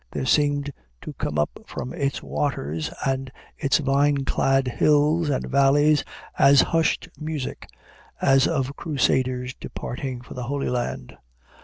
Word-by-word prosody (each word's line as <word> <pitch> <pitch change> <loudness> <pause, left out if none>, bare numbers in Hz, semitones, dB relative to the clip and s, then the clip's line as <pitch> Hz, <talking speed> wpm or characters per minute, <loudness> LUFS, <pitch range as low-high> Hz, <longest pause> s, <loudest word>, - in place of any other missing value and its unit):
There - - -3
seemed 145 +1 +2 0.3
to - - -7
come 75 - -3
up 75 - -1
from 125 - -6
its 140 -5 -2
waters 80 - -2 0.2
and 135 -1 -1 0.2
its 140 - +2
vine 140 -1 +1
clad 135 -1 +2
hills 150 +5 +2
and 135 - -1
valleys 145 +2 +4 0.4
a 140 +1 +7
hushed 165 +3 +2
music 155 -3 -5 0.5
as 135 0 +4
of 140 -3 -1
Crusaders 130 -4 0
departing 125 -1 -6
for 125 - -11
the 125 - -6
Holy 140 0 -1
Land. 120 - -3
140 Hz, 135 wpm, -24 LUFS, 130-145 Hz, 0.5 s, a